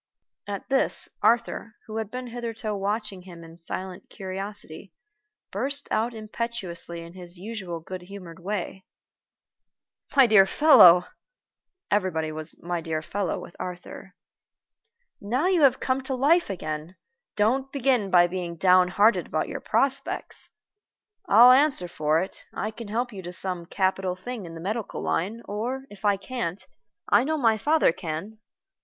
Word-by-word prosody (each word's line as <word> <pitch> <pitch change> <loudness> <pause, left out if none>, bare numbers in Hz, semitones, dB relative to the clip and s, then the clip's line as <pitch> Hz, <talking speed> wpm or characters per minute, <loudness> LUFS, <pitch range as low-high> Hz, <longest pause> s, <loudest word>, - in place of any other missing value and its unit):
At 200 -1 -5
this, 270 0 +3
Arthur, 230 -1 +1
who 220 0 -6
had 220 -2 -3
been 250 +2 -6
hitherto 230 -3 -5
watching 205 -1 -3
him 175 -2 -12
in 165 +1 -14
silent 185 +2 -6
curiosity, 195 -2 -7 0.6
burst 275 +8 -2
out 230 +2 0
impetuously 210 -6 -5
in 170 +1 -12
his 180 -1 -9
usual 190 -4 -6
good 185 +2 -7
humored 180 -3 -10
way: 190 0 -4 1.3
"My 270 -2 +8
dear 210 -4 +6
fellow" 180 - +7 0.9
(everybody 180 -6 0
was 155 +1 -3
"my 175 0 -2
dear 155 -1 -3
fellow" 195 0 -2
with - - -11
Arthur), 180 +1 -8 1.1
"now 245 +10 0
you 365 -3 +3
have 265 -3 +5
come 260 +1 0
to 265 0 -3
life 300 +5 +3
again, 155 -2 -5 0.4
don't 260 +6 +1
begin 255 -7 +1
by 175 -1 +6
being 175 -1 -4
down 180 +1 +5
hearted 205 +5 +3
about - - -2
your - - -5
prospects. 275 0 -1 0.8
I'll 245 -5 +8
answer 265 -8 +3
for 155 -1 +1
it 190 - -9
I 215 - -2
can 230 0 -9
help 235 +3 -2
you 195 - -7
to 175 -1 -7
some 180 -2 -2
capital 190 0 0
thing 205 +1 -7
in 165 - -9
the 165 - -8
medical 215 +4 -4
line, 215 +7 -2
or, 245 +6 -4
if 205 0 -13
I 205 -1 +3
can't, 200 -3 -4 0.4
I - - +4
know 315 +3 -1
my 230 -6 +3
father 295 - +3
can." 185 +5 -6
200 Hz, 150 wpm, -26 LUFS, 180-235 Hz, 1.3 s, My